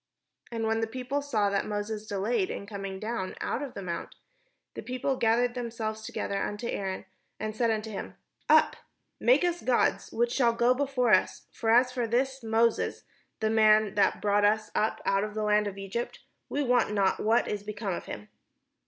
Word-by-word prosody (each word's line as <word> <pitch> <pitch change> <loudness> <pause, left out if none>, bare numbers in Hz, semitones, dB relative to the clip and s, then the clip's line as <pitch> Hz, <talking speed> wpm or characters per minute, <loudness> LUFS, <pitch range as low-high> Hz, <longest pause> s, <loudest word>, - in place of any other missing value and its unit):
And 225 -1 -2
when 225 0 +1
the 225 - 0
people 255 +4 -3
saw 215 -8 0
that 200 - 0
Moses 210 +1 -4
delayed 205 0 0
to - - -5
come 195 -2 -6
down 215 -3 -3
out - - -2
of 280 -3 -6
the 200 - -5
mount, 170 -2 -5 0.6
the - - -6
people 255 +2 -2
gathered 240 +1 +2
themselves 225 -3 -4
together 210 - -4
imto 210 +4 -3
Aaron, 190 -1 -3 0.3
and 215 0 -4
said 235 0 +1
imto 220 0 -2
him: 200 - -6 0.2
" - - -42
Up, - - +5 0.4
make - - +4
us 350 -1 0
gods, 250 -2 +1
which 235 +1 +1
shall 240 -4 +3
go 240 +2 +3
before 255 -4 +1
us; 185 - +2
for 225 - -3
as 245 +2 +5
for 245 -2 -1
this 265 +3 0
Moses, 225 0 +1 0.4
the 220 0 +1
man 215 -1 +5
that 205 - +2
brought 205 0 +3
us 215 +1 +2
up 215 - 0
out 195 0 +2
of 210 0 -5
the 215 - -1
land 210 0 +3
of 200 - -5
EgyjDt, 195 +4 -4 0.3
we 290 - 0
wot 245 -4 +2
not 200 -2 +2
what 225 +2 +2
is 205 -1 -2
become 205 -1 -4
of - - -5
him." 105 0 -8
220 Hz, 195 wpm, -28 LUFS, 205-240 Hz, 0.6 s, Up